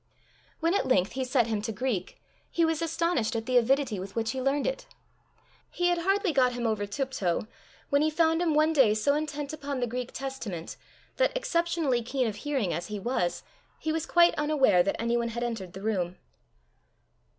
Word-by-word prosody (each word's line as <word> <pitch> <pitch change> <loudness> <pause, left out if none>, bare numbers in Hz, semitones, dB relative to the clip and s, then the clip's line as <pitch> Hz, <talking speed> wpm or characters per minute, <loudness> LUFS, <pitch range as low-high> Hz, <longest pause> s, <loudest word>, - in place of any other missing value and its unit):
When 330 +2 +2
at 400 - +1
length 190 -7 +2
he 260 +1 -2
set 250 -1 +2
him 220 -2 -2
to 220 +2 -3
Greek, 215 -4 -3 0.3
he 335 - +2
was 325 0 0
astonished 330 -8 0
at 225 0 -2
the 255 - -1
avidity 250 -3 +2
with 190 +1 -8
which 225 -1 0
he 265 - -3
learned 275 +2 +1
it! - - -3 0.8
He 355 0 +1
had 350 -1 +1
hardly 390 0 +1
got 255 -2 +3
him 240 -1 -3
over 215 -2 0
τύπτω, 210 -5 -2 0.4
when 285 0 +4
he 310 - +3
found 325 +1 +2
him 325 -4 +1
one 310 +1 +4
day 250 -8 +5
so 250 +7 +2
intent 295 -1 -3
upon 285 -3 -4
the 245 - +1
Greek 245 +1 -4
Testament, 235 -11 -5 0.4
that, - - +2
exceptionally 335 - 0
keen 255 +2 -1
of 215 -2 -3
hearing 260 -8 -1
as 175 - -4
he 210 -1 -5
was, 195 -5 -1 0.3
he 315 - -2
was 320 0 -2
quite 345 0 +5
unaware 280 -11 +4
that 195 +3 -1
anyone 235 0 0
had 235 +1 -4
entered 215 -7 -4
the 190 - -9
room. 185 -5 -1
260 Hz, 195 wpm, -28 LUFS, 220-310 Hz, 0.8 s, day